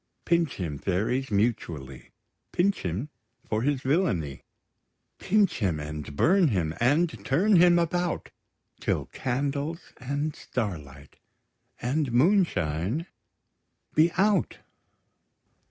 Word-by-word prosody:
Pinch 170 -2 +1
him, 80 -7 -4
fairies, 110 +8 -1
mutually, 85 - -2 0.4
Pinch 195 +3 +1
him 95 - -3 0.4
for 110 0 0
his 140 +1 0
villainy; 130 - 0 0.8
Pinch 205 -4 +2
him, 90 -8 0
and 75 -1 -6
burn 180 - +4
him, 90 - 0
and 135 -3 +2
turn 180 - +3
him 175 0 +6
about, 175 +1 -1 0.5
Till - - -1
candles, 140 +5 -3
and 140 +4 -3
starlight, 75 - -5 0.6
and 135 +2 -1
moonshine 120 - +2 0.9
be 160 +2 +4
out! 200 +2 +2
130 Hz, 100 wpm, -27 LUFS, -, 0.9 s, him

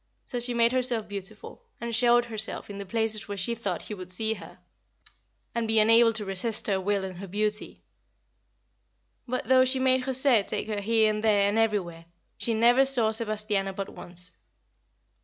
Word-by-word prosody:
So 245 - -4
she 240 0 -2
made 235 0 +4
herself 250 -4 +1
beautiful, 200 - -6 0.2
and 235 0 -5
showed 240 +1 +4
herself 220 -2 -3
in 200 - -8
the 200 - -7
places 220 0 -1
where 205 -1 -6
she 195 +5 -1
thought 230 0 -4
he - - -7
would 185 -2 -8
see 220 +4 +1
her - - -12 1.0
and 235 -1 -2
be 220 0 +1
unable 230 +2 +5
to 215 -1 -4
resist 195 +4 0
her 195 -2 0
will 200 0 -1
and 185 -2 -8
her 195 - -7
beauty; 210 +2 -3 1.4
but 255 +1 -3
though 260 0 +5
she 260 +1 0
made 260 0 +2
José 260 -5 +2
take - - -3
her 210 -1 -2
here 220 +1 +3
and 215 0 -4
there 205 -2 +3
and 205 +2 0
everywhere, 185 -7 -1 0.3
she 230 - -1
never 240 +4 +4
saw 250 -5 +4
Sebastiano 215 -3 -2
but 195 0 -5
once. 180 0 -10
220 Hz, 180 wpm, -26 LUFS, 200-235 Hz, 1.4 s, unable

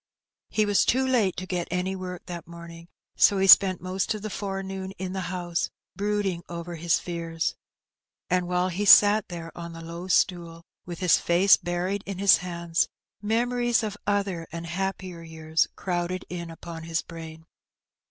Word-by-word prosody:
He 215 - +1
was 205 -1 +3
too 260 +2 +2
late 235 -8 +1
to 185 - -4
get 180 -2 -3
any 180 +2 -1
work 180 -1 -7
that 170 -3 -7
morning, 170 0 -11 0.3
so 200 - +5
he 190 - +2
spent 190 -1 +7
most 190 +3 -1
of 210 - -8
the 215 - -4
forenoon 195 -1 -4
in 185 0 -4
the 185 -2 -3
house, 175 -2 -2 0.3
brooding 200 -3 -1
over 170 0 -6
his 170 0 +1
fears. 165 -2 -3 0.7
And 180 -1 +1
while 180 +1 +1
he 185 +3 -2
sat 205 +1 +7
there 165 -2 -8
on 170 -1 -7
the 165 - -9
low 170 +2 -7
stool 170 -3 0 0.2
with 175 +1 -7
his 180 -2 +4
face 180 +3 +5
buried 180 +3 -2
in 195 -2 -4
his 200 0 +6
hands, 170 -2 -1 0.3
memories 240 +2 +1
of 210 -2 -3
other 195 -5 -1
and 170 0 -6
happier 185 0 -4
years 160 -1 -1
crowded 180 0 -3
in 170 -1 -5
upon 165 0 -8
his 165 0 -1
brain. 160 -1 -10
180 Hz, 170 wpm, -26 LUFS, 170-195 Hz, 0.7 s, spent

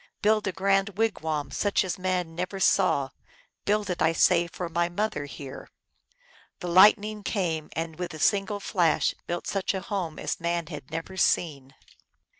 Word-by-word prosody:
Build 215 0 +3
a - - +1
grand 195 +1 +1
wigwam 160 -10 -1
such 200 +7 +1
as 185 -1 -3
man 180 -3 -1
ne 175 +2 -2
er 195 - -6
saw! 180 -8 +3 0.6
Build 210 0 +1
it, 180 -2 -3
I 160 +1 +3
say, 170 +1 +4
and 170 -1 -5
for 180 - -4
my 170 +1 0
mother 175 -5 -2
here! 140 -1 -9 0.5
" - - -30
The 180 - -5
Lightning 210 +4 +5
came, 170 -7 -2
and 165 0 -4
with 175 -2 -4
a - - -9
single 200 +3 +1
flash 175 -5 +1
built 175 0 -3
such 195 0 -1
a - - -1
home 180 -7 -3
as - - -3
man 170 0 -1
had 150 -5 -9
never 165 +4 -6
seen. 140 -7 0
180 Hz, 180 wpm, -27 LUFS, 165-200 Hz, 0.6 s, Lightning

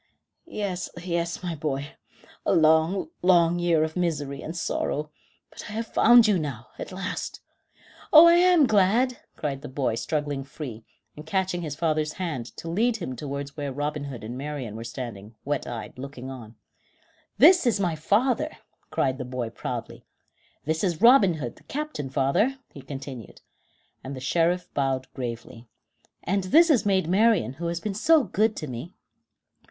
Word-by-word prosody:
"Yes, 195 - -3
yes, 170 0 -3
my 175 -2 -2
boy; 145 -2 -3 0.5
a - - +2
long, 160 - +3
long 175 -1 +4
year 170 -3 +3
of 160 0 -3
misery 150 -6 -2
and 165 +2 -6
sorrow; 150 -2 -2 0.4
but - - -10
I - - -7
have 225 +1 -2
found 235 0 +6
you 200 -4 +3
now, 125 -8 -5
at - - -6
last." 185 0 -5 0.7
"Oh! 315 +2 +10
I 340 - +7
am 350 -3 +5
glad," 225 +4 +2 0.2
cried 140 -3 -3
the 150 - -7
boy, 130 -3 -1
struggling 145 +2 -2
free, 135 -5 -8 0.3
and 150 - -9
catching 185 +1 -1
his 150 -4 -4
father's 155 -1 0
hand 155 -10 -4
to - - -8
lead 220 +7 +1
him 150 -10 -5
towards 140 +1 -6
where 145 -3 -4
Robin 145 +2 -3
Hood 130 -5 -7
and 115 +3 -6
Marian 135 -5 -5
were 115 - -6
standing, 115 -3 -7
wet 145 -1 -2
eyed, 120 +1 -7
looking 135 -1 -7
on. 115 -4 -10 0.8
"This 345 +1 +7
is 220 -4 +2
my 175 -4 0
father," 240 - +1 0.4
cried 130 0 0
the - - -2
boy 125 -2 -4
proudly. - - -6 0.6
"This 160 +3 -1
is 175 -5 0
Robin 225 -6 +6
Hood, 130 -6 -6
the - - -19
captain, 295 - -4
father," 140 - +1 0.2
he 140 - -10
continued, 135 -5 -9 0.6
and 135 +1 -6
the - - -7
Sheriff 170 +6 +1
bowed 135 -2 -1
gravely; 115 -2 -6 0.6
"and 195 +1 0
this 325 - +6
is 245 -7 +3
Maid 190 -4 +2
Marian, 200 - +3
who 170 - -1
has 170 0 -2
been 210 +3 -3
so 310 +9 +4
good 215 0 +1
to - - -5
me." 130 +6 -7
160 Hz, 170 wpm, -26 LUFS, 135-195 Hz, 0.8 s, Oh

